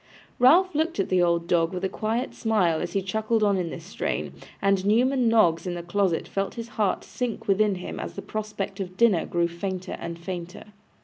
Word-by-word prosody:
Ralph 340 +9 +6
looked 315 -3 0
at 195 - 0
the 185 -1 +3
old 170 -1 +2
dog 165 -2 +2
with 180 - -4
a - - +2
quiet 225 +6 -2
smile 190 -8 +1
as - - -4
he 195 -2 0
chuckled 220 +3 0
on 200 -1 +3
in 175 -2 -2
this 165 - -7
strain, 190 - -3 0.3
and 195 -1 +2
Newman 245 +5 +3
Noggs 185 -7 +3
in 175 - -2
the 170 - -5
closet 175 -1 0
felt 195 0 -2
his 230 -1 -6
heart 210 -5 0
sink 245 -3 -4
within 205 0 +3
him 180 - -6
as - - -6
the - - -6
prospect 210 -2 -4
of 185 -1 -5
dinner 215 -7 +3
grew 170 0 +1
fainter 185 +2 -4
and 170 0 -5
fainter. 175 0 -6
195 Hz, 205 wpm, -25 LUFS, 175-220 Hz, 0.3 s, Ralph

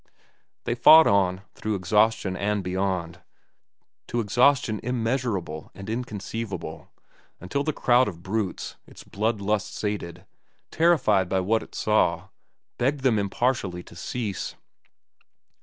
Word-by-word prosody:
They - - -1
fought 155 +7 +8
on, 95 -1 +2
through 110 0 -3
exhaustion 105 +1 +2
and 105 +1 -1
beyond, 90 -2 -2 0.9
to 120 - -2
exhaustion 120 0 +2
immeasurable 115 - -2
and 95 -1 -9
inconceivable, 110 -4 -5 0.5
until 115 +11 -2
the 155 - 0
crowd 125 -3 +3
of 85 -4 -7
brutes, 100 0 -3
its - - -13
blood 110 +2 -1
lust 105 0 -1
sated, 105 -5 -4 0.5
terrified 110 - +3
by 95 0 +1
what 110 +4 +1
it - - -12
saw, - - +1 0.5
begged 135 +3 +1
them 125 -5 +3
impartially 100 -3 -1
to - - -15
cease. 105 +1 -4
105 Hz, 120 wpm, -25 LUFS, 95-120 Hz, 0.9 s, fought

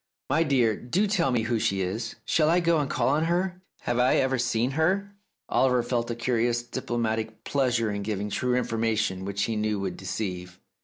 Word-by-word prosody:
"My 160 - +3
dear, 130 -8 +3
do 175 - 0
tell 195 -8 +1
me 120 -3 +1
who 115 0 0
she 95 -2 0
is? 110 +5 -3
Shall 155 -1 +3
I 175 +2 +4
go 170 -2 +2
and 145 - -1
call - - +1
on 150 +3 +2
her? 180 +2 -1 0.2
Have 120 0 -1
I 125 +1 +4
ever 130 -1 +1
seen 120 +1 +1
her? 190 +7 0 0.2
" - - -61
Oliver 125 -2 +3
felt 120 -1 -1
a 120 - -2
curious 120 0 0
diplomatic 115 -3 -3
pleasure 125 -5 +1
in 100 0 -3
giving 105 0 -3
true 125 +3 0
information 110 -5 0
which 100 0 -2
he 115 - -1
knew 105 -1 0
would 95 -1 -3
deceive. 90 -2 -5
120 Hz, 200 wpm, -26 LUFS, 110-135 Hz, 0.2 s, I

